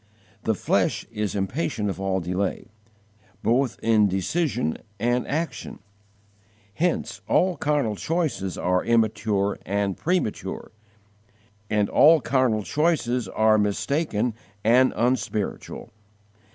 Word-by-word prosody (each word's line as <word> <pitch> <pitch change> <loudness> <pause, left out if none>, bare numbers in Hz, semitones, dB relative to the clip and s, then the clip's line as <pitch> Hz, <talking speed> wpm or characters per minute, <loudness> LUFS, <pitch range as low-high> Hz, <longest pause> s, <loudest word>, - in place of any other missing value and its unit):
The - - +2
flesh - - 0
is 105 -3 -3
impatient 105 - -1
of 95 -1 -4
all 95 -1 0
delay, 90 +4 -3 0.7
both 125 +2 +1
in 110 -2 +4
decision 95 - -1 0.2
and 120 +2 0
action; 160 +4 -3 1.0
hence 175 - -1
all 185 -1 +3
carnal 145 -9 0
choices 150 - -2
are 90 0 +1
immature 110 -3 +1
and 100 0 -1
premature, 155 - -2 1.0
and 105 -1 +2
all 160 +2 +6
carnal 130 -5 +1
courses 125 - 0
are 110 +2 +3
mistaken 115 +2 0 0.3
and 125 +4 +5
unspiritual. 120 -4 -2
115 Hz, 100 wpm, -24 LUFS, 100-140 Hz, 1.0 s, all